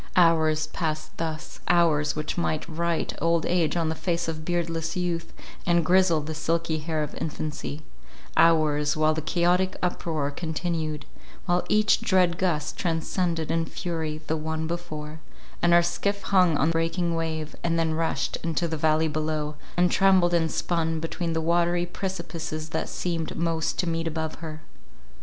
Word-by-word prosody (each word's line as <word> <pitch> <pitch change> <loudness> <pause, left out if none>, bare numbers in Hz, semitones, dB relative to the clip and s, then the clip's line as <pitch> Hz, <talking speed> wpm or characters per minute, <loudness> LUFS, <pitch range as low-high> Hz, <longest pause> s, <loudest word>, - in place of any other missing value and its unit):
Hours 160 -3 +4
passed 155 -1 -3
thus—hours 160 -1 +1
which 155 0 -3
might 155 -2 -1
write 170 0 -1
old 165 -1 +2
age 175 -2 +1
on 165 -2 +1
the - - 0
face 170 +1 -1
of 155 -1 -4
beardless 165 -1 -1
youth, 175 -2 -2 0.3
and 170 -2 +2
grizzle 180 -2 +4
the 155 +2 -5
silky 165 0 -1
hair 155 0 -1
of 150 - -6
infancy— 155 -1 -4 0.5
hours, 155 -2 +4
while 155 0 +3
the 160 - -2
chaotic 180 +3 +1
uproar 160 -5 -1
continued, 160 -1 -3 0.4
while 175 -1 +2
each 215 0 +4
dread 180 -3 +3
gust 155 -5 0
transcended 165 -1 -1
in 165 0 +1
fury 160 -4 -3
the 160 - 0
one 160 +1 -2
before, 160 -2 -5 0.4
and 175 - +4
our 170 0 +6
skiff 200 +4 -1
hung 180 -5 +4
on 155 +3 +3
the - - 0
breaking 165 +1 0
wave, 160 -2 -3
and 165 -1 +1
then 165 -1 +1
rushed 160 -3 -1
into 165 +1 -1
the 160 -1 -3
valley 155 +1 +3
below, 155 0 -2 0.2
and 175 0 +4
trembled 185 -2 +4
and 165 -2 +2
spun 165 -2 0
between 165 +1 -3
the 160 - 0
watery 175 +1 +2
precipices 165 -4 -5
that - - -2
seemed 165 -3 -3
most 165 -1 0
to 180 - 0
meet 165 0 -1
above 160 0 -2
her. 155 -1 -7
165 Hz, 160 wpm, -26 LUFS, 155-175 Hz, 0.5 s, our